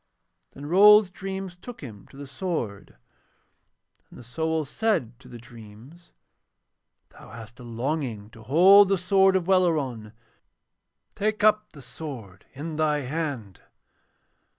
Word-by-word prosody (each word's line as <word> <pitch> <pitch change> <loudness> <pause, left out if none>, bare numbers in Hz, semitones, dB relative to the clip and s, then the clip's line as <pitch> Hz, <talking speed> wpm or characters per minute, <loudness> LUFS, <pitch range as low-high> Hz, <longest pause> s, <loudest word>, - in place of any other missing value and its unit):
Then 140 - -10
Rold's 205 +4 +6
dreams 190 -1 -7
took 235 +7 -12
him 110 -8 -11
to 135 - -17
the 140 - -8
sword, 135 - -5 1.1
and - - -15
the - - -12
soul 160 +5 -3
said 135 - -2
to - - -17
the 120 - -11
dreams: 120 +8 -15 1.0
'Thou - - -16
hast 115 +1 -12
a - - -11
longing 120 -3 -4
to 115 - -15
hold 185 - +6
the 195 - +2
sword 190 +1 +3
of 185 -2 0
Welleran: 150 - 0 1.0
take 215 0 -2
up 215 0 +2
the 140 -4 -13
sword 120 - -10
in 150 +3 -7
thy 150 -2 0
hand.' 130 - -5
150 Hz, 130 wpm, -25 LUFS, 120-185 Hz, 1.1 s, Rold's